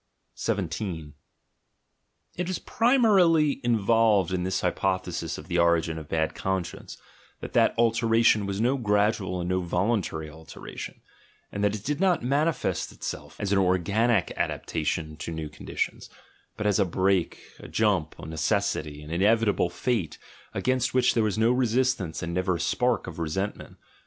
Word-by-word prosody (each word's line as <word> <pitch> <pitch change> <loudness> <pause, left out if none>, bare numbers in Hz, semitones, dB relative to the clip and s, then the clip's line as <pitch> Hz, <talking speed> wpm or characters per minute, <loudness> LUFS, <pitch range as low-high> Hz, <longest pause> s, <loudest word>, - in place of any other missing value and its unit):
17 90 -6 -3 1.2
It 180 +1 -3
is 185 - -1
primarily 195 - +3
involved 110 -4 +3
in 90 - 0
this 95 +1 -1
hypothesis 90 -2 -1
of - - -10
the 90 -1 0
origin 85 -1 +2
of 80 - -9
the - - -3
bad 80 -1 0
conscience, 95 -2 -4 0.4
that - - -8
that - - +3
alteration 115 -2 +3
was 100 0 -3
no 125 +5 +2
gradual 105 -4 +1
and 85 - -3
no 90 0 0
voluntary 90 -3 -1
alteration, 80 +1 -9 0.5
and 100 - -3
that 105 0 +2
it 105 - -7
did 145 +1 -1
not 185 -6 +2
manifest 145 +3 0
itself - - -7
as 100 - -2
an 100 - +4
organic 100 +3 +2
adaptation 80 -1 -2
to 80 - -6
new 80 -2 -5
conditions, - - -4 0.5
but 105 - -3
as 105 0 +2
a - - +5
break, 95 0 +1 0.2
a - - -10
jump, 100 -8 +1
a - - -9
necessity, 75 -1 -1
an 75 - -10
inevitable 105 +1 +2
fate, 100 - -2 0.3
against 130 0 0
which 125 -1 +4
there 115 - +2
was 110 -2 0
no 115 +2 +4
resistance 125 -8 0
and 85 0 -3
never 90 0 0
a - - -4
spark 120 +6 +1
of - - -8
re 80 -1 -2
sentment. 95 +6 -4
100 Hz, 155 wpm, -26 LUFS, 85-115 Hz, 1.2 s, a